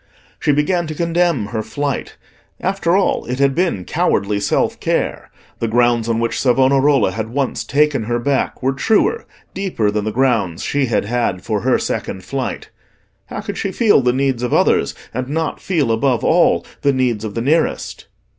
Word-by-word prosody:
She - - +2
began 160 +4 +1
to 155 - -5
condemn 170 -6 +1
her 110 -2 -2
flight: 145 +4 -4 0.4
after 190 -2 +1
all, 195 - +1
it 125 +1 -3
had 140 0 +3
been 170 - -1
cowardly 100 +1 0
self 100 - 0
care; - - -2 0.3
the 115 - -1
grounds 120 0 +2
on 115 0 +1
which 115 0 -1
Savonarola 135 -1 +3
had 110 +3 -4
once 135 +2 -2
taken 145 -5 +1
her 120 +1 0
back 135 +1 -1
were 135 +1 +2
truer, 220 - +1 0.3
deeper 175 - -1
than 105 0 -2
the 110 - -1
grounds 110 -8 0
she 140 -2 0
had 115 - 0
had 115 -5 -1
for - - -1
her - - +2
second 95 - -4
flight. 130 +7 -4 0.6
How - - -5
could - - -6
she 195 - -2
feel 210 - +4
the 125 -1 +2
needs 135 -1 0
of 125 - 0
others - - +2 0.2
and 130 +2 -3
not 160 +1 -2
feel, 155 -11 0
above 120 +1 +1
all, - - +3 0.2
the 140 - +2
needs 125 -5 0
of 105 -2 -5
the 115 - -1
nearest? 155 +6 0
130 Hz, 180 wpm, -18 LUFS, 115-150 Hz, 0.6 s, feel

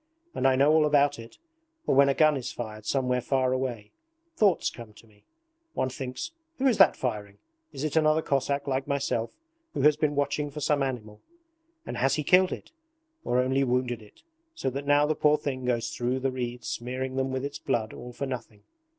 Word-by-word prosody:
And - - +1
I 130 - +4
know 140 +3 +4
all 155 -1 +5
about 145 -1 +3
it! 115 0 -11 0.5
Or - - +2
when 140 +1 +6
a 135 - +2
gun 155 -1 +4
is 130 -3 -4
fired 110 -2 -7
somewhere 125 -2 +1
far 130 0 +1
away, 120 -5 -3 0.4
thoughts 200 - +3
come 115 -3 -11
to 110 - -17
me. 105 -2 -25 0.5
One 130 - 0
thinks, 130 - -5 0.3
who 270 - -1
is 250 -6 +3
that 190 -5 +7
firing? 105 -5 -4 0.3
Is 135 - -6
it 155 0 -2
another 155 0 +3
Cossack 140 +1 0
like 135 0 -1
myself 140 -5 -1 0.4
who - - 0
has 150 0 +5
been 150 -1 0
watching 145 +1 0
for 145 +2 -7
some 150 -1 +1
animal? 110 -6 -4 0.6
And - - -5
has 135 +1 +2
he 150 - -2
killed 185 +4 +5
it? - - -7 0.5
Or 125 - 0
only 135 +2 +1
wounded 125 -2 0
it 105 - -19 0.3
so 130 - -2
that 140 +2 -5
now 145 +1 +5
the 155 - +1
poor 150 0 +3
thing 130 -3 -4
goes 120 -2 0
through 125 +2 -1
the 135 0 0
reeds 125 -1 -5
smearing 130 +2 -4
them 135 0 -1
with 130 +1 -2
its 145 +1 -5
blood 110 -2 -1
all 125 - -9
for 140 - -4
nothing? 120 -5 -7
130 Hz, 205 wpm, -27 LUFS, 125-145 Hz, 0.6 s, that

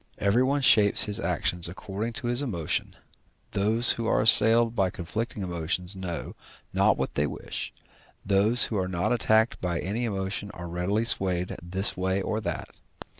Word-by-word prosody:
Everyone 130 +8 +1
shapes 105 -6 +6
his 105 -2 0
actions 85 -1 -1
according 100 +5 -6
to 140 -1 -6
his 120 +2 0
emotion, 90 - -2 0.6
those 110 +4 +4
who 115 -1 -3
are - - +2
assailed 115 +1 +4
by 95 -4 +1
conflicting 105 +5 -5
emotions 90 +1 -2
know 90 -3 -6 0.4
not - - +3
what - - -3
they 75 +1 0
wish; - - -6 0.5
those 100 +5 +4
who 110 - -1
are 95 -1 -1
not 90 +4 -1
attacked 110 -1 +1
by 85 -2 -2
any 110 +6 -3
emotion 100 -1 -4
are 85 0 -7
readily 90 +6 -1
swayed 90 -5 -2
this 95 +4 +1
way 95 +1 -1
or 110 +3 -3
that. - - -4
100 Hz, 160 wpm, -26 LUFS, 90-115 Hz, 0.6 s, shapes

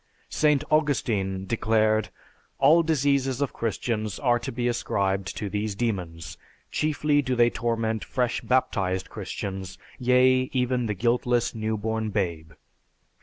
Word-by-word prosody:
St. 150 -3 +2
Augustine 110 -11 +1
declared, 110 0 +1 0.5
"All 165 +3 +6
diseases 140 -4 +1
of 140 -2 -1
Christians 110 -2 -2
are 120 -4 +2
to 120 - -5
be 120 +1 -1
ascribed 95 -5 -1
to 105 - -3
these 105 +1 -2
demons, 90 -8 -3 0.3
chiefly 150 -1 +1
do 130 -2 -1
they 120 0 +4
torment 115 -2 -1
fresh 125 -1 -1
baptized 100 -8 0
Christians, 95 -1 -5 0.2
yea, 130 +1 +4
even 125 -2 0
the 105 - -2
guiltless, 120 +3 +1
new 110 -1 -2
born 110 +1 -2
babe." 85 -6 -3
115 Hz, 125 wpm, -26 LUFS, 100-130 Hz, 0.5 s, All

